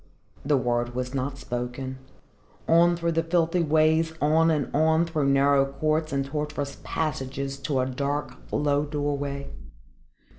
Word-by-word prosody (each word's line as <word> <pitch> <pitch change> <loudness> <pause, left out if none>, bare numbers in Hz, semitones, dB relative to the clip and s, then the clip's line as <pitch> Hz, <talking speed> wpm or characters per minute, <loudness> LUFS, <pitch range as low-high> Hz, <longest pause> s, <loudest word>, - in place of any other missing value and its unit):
The 145 0 +2
word 120 -1 -1
was 125 +1 -3
not 135 +1 -2
spoken. 125 +1 -5 0.7
On 170 +1 +5
through 170 0 0
the 165 0 +1
filthy 165 +1 +1
ways, 160 +1 +3
on 160 +3 +3
and 150 -4 -1
on, 160 +2 +3
through 155 -4 0
narrow 140 0 +4
courts 155 +2 0
and 140 0 0
tortuous 150 0 -4
passages 135 -3 -3
to 135 -2 0
a - - 0
dark 140 +3 -3 0.2
low 145 0 +1
doorway. 145 -1 -3
145 Hz, 140 wpm, -26 LUFS, 135-160 Hz, 0.7 s, On